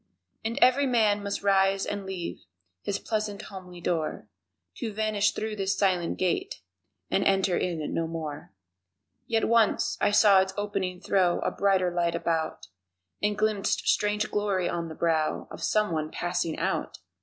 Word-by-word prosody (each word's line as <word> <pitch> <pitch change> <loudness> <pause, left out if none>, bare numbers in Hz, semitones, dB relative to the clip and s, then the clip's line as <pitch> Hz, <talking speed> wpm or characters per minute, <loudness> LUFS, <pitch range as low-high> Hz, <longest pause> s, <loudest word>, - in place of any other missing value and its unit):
And 225 +3 -3
every 270 +3 +4
man 215 -4 +3
must 200 0 -3
rise 195 0 +3
and 200 -1 -4
leave 175 - -5 0.4
His 200 - -2
pleasant 215 -2 -3
homely 185 -3 -10
door 160 -10 -2 0.5
To 225 - -3
vanish 210 -1 +1
through 220 0 -3
this 195 0 0
silent 180 -4 +1
gate 180 - -1 0.5
And 195 - +2
enter 195 -2 +2
in 165 -5 -2
no 165 0 0
more 155 -6 -6 0.8
Yet 225 -1 +1
once 230 -2 +2
I 205 - +4
saw 205 -2 +6
its 190 0 -3
opening 195 -3 -2
throw 180 -3 +2
A - - 0
brighter 190 -2 +2
light 170 -1 +1
about 160 -1 -2 0.6
And 210 0 0
glimpsed 210 -2 0
strange 210 +1 +1
glory 200 -4 0
on 170 -1 -3
the 160 - -8
brow 160 -2 0
Of - - -9
someone 165 -8 0
passing 175 -2 -2
out! - - -2
195 Hz, 155 wpm, -27 LUFS, 175-210 Hz, 0.8 s, saw